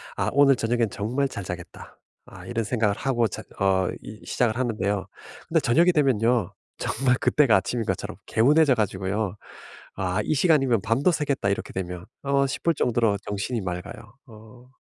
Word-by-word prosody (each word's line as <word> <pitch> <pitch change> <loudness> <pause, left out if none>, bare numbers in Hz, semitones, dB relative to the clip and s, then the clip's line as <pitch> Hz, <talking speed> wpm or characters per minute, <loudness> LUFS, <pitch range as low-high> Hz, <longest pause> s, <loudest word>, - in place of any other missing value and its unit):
'아 - - 0
오늘 140 -1 +5
저녁에는 115 -1 0
정말 125 +7 -1
잘 100 -6 -7
자겠다.' 90 -1 -9 0.3
아 - - -12
이런 115 -1 -2
생각을 110 -2 0
하고 120 -2 0
자 95 - -7 0.2
어 95 -2 +2
이 105 - -11
시작을 120 -2 0
하는데요. 105 -6 -1 0.4
근데 - - +2
저녁이 170 +9 +4
되면요. 125 - +2 0.3
정말 125 +1 +1
그때가 140 -9 +4
아침인 115 +4 -2
것처럼 - - -3
개운해져 145 +5 +4
가지고요 100 -2 -2 0.6
'아 90 -1 -1
이 - - 0
시간이면 135 - +3
밤도 115 - +2
새겠다 145 - -1
이렇게 100 - -3
되면.' 90 -1 -5 0.2
어 140 0 +2
싶을 165 +5 0
정도로 115 -5 +1
정신이 105 +3 -3
맑아요. 95 +4 -7
어. 110 +2 -15
115 Hz, 355 characters per minute, -25 LUFS, 100-135 Hz, 0.6 s, 오늘